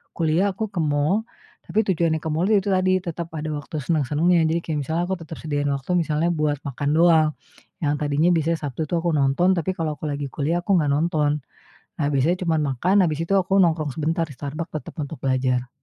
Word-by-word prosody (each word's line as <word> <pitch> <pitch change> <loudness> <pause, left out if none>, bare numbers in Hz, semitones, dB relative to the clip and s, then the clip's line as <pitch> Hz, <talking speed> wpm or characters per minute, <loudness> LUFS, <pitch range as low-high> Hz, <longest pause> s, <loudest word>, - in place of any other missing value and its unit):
kuliah, 165 +4 +2
aku 220 +3 -3
ke 175 - -2
mall, 150 +8 +1 0.4
tapi 220 - +1
tujuannya 165 -3 +1
ke 160 - -4
mall 165 +4 +1
itu 205 -2 +2
tadi, 185 0 +3
tetap 170 -1 -5
ada 155 +1 -3
waktu 145 +1 -5
seneng-senengnya, 160 +4 +2
jadi 165 +1 +1
kayak 155 -2 -2
misalnya 160 +5 -1
aku 190 - 0
tersedia 155 -2 -4
waktu 140 +4 -3
misalnya 165 0 +1
buat 150 -2 0
makan 140 +1 -3
doang, 160 -2 +5 0.5
yang 145 0 +2
tadinya 150 +4 +2
biasanya 165 0 +1
Sabtu, 145 +1 -3
itu - - -5
aku 170 0 0
nonton, 145 +7 +3
tapi 170 +2 0
kalau 155 -3 -2
aku 155 - -7
lagi 145 0 -3
kuliah, 160 +4 -1
aku 200 - +3
nggak 145 - 0
nonton. 150 -1 +1 0.6
Nah, 145 - +1
biasanya 155 +7 +2
cuman 160 -2 +1
makan, 180 +10 +1
habis 155 -1 -2
itu 195 - -1
aku 190 +1 +1
nongkrong 160 -4 +1
sebentar 165 +2 0
di - - -9
Starbucks 150 +4 -5
tetap 155 - -6
untuk 150 +1 -4
belajar. 130 -2 0
160 Hz, 200 wpm, -23 LUFS, 145-170 Hz, 0.6 s, doang